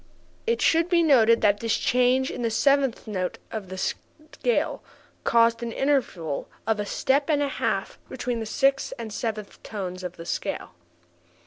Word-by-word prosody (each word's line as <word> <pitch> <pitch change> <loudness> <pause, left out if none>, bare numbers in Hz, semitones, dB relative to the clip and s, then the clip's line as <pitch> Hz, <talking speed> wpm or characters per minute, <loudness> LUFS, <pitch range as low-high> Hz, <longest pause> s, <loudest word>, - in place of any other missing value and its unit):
It 465 0 +1
should 330 +1 +3
be 345 -2 +4
noted 230 -7 +5
that 205 -1 +3
this 230 -1 +1
change 250 +1 +2
in - - -5
the 230 - +1
seventh 275 +2 +2
tone 185 -5 -1 0.2
of 210 -4 -5
the 190 - -6
scale 310 - -2 0.4
caused 230 0 +3
an 235 -1 -3
interval 225 - -1 0.2
of 220 -1 +1
a 205 - -2
step 280 +7 +1
and 290 -2 +3
a - - +1
half - - -2
between 245 -2 -3
the 220 - -4
sixth 270 +4 +1
and 225 -3 -6
seventh 215 -3 -4
tones 185 -3 -6
of 180 - -6
the 165 - -8
scale. - - -3
230 Hz, 165 wpm, -25 LUFS, 210-275 Hz, 0.4 s, noted